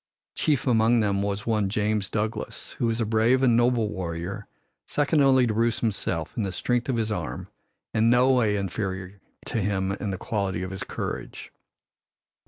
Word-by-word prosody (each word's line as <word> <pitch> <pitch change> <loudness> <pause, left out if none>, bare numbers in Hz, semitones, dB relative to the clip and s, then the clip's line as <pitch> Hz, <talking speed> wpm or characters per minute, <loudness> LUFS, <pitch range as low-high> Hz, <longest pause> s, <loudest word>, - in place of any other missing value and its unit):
Chief 145 -4 +1
among 115 -1 +4
them 100 -2 +1
was 100 0 -2
one 105 -4 +1
James 105 0 0
Douglas, 110 +1 -3
who 120 - +2
was 115 0 0
a 115 - +1
brave 115 +4 +3
and 120 -3 +5
noble 120 -2 +3
warrior, 95 +2 -5 0.4
second 145 +1 +2
only 130 -2 +5
to 110 - 0
Bruce 115 +1 +1
himself 95 -7 -2
in - - -1
the 100 -2 -2
strength 120 +6 -1
of 125 - +1
his 110 -1 -1
arm 105 - -4 0.4
and 110 +1 +3
no 125 +2 +5
way 115 -5 +3
inferior 95 -1 -4 0.2
to 115 - -2
him 95 -1 0
in 100 +1 -3
the 95 - -2
quality 100 -4 -2
of 95 - -5
his 95 - -5
courage. - - -5
110 Hz, 180 wpm, -26 LUFS, 100-120 Hz, 0.4 s, and